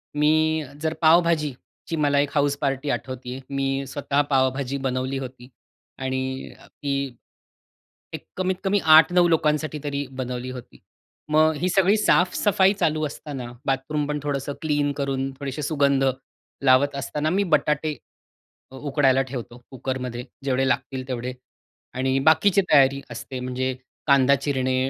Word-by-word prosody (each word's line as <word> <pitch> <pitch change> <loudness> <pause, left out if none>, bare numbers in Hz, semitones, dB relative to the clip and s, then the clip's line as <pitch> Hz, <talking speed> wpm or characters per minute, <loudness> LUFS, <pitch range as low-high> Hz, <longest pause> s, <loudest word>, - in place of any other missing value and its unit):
मी 155 +1 +2 0.2
जर 160 0 0
पाव-भाजीची 165 -2 +1
मला 145 -2 +2
एक 145 0 +1
हाउस 145 -1 +2
पार्टी 135 0 -1
आठवतेय, 130 0 -4
मी 135 0 -1
स्वतः 140 +1 0
पावभाजी 135 0 +1
बनवली 130 0 -2
होती 130 -1 -8 0.5
आणि 130 0 -3
ती 140 -3 -3 1.0
एक - - -7
कमीत 185 0 0
कमी 200 +1 +2 0.2
8-9 175 +2 +6
लोकांसाठी 155 -1 +1
तरी 145 -1 -2
बनवली 125 -1 -5
होती. 125 -2 -11 0.5
मग 155 0 +4
ही 180 - +1
सगळी 195 +2 +4
साफ-सफाई 190 0 +3
चालू 155 -5 0
असताना, 140 -4 -7
बाथरूम 140 +2 -1
पण 150 0 -2
थोडंसं 145 -1 -2
क्लीन 145 -2 +1
करून, 135 -1 -1
थोडेसे 140 +1 -4
सुगंध 140 -2 +2 0.6
लावत 135 +2 +4
असताना, 145 +3 -2
मी 195 +4 +1
बटाटे 150 +1 -1 0.7
अ, - - -11
उकडायला 135 -1 +2
ठेवतो 125 -2 -6
कुकरमध्ये, 125 -2 -4 0.2
जेवढे 135 0 +1
लागतील 130 0 -2
तेवढे. 125 -1 -4 0.6
आणि 130 +1 0
बाकीची 200 +5 +5
तयारी 140 -1 +5
असते, 125 +2 -6
म्हणजे 130 +1 -2 0.3
कांदा 140 -1 +5
चिरणे, 130 -2 -1
140 Hz, 130 wpm, -24 LUFS, 130-155 Hz, 1.0 s, 8-9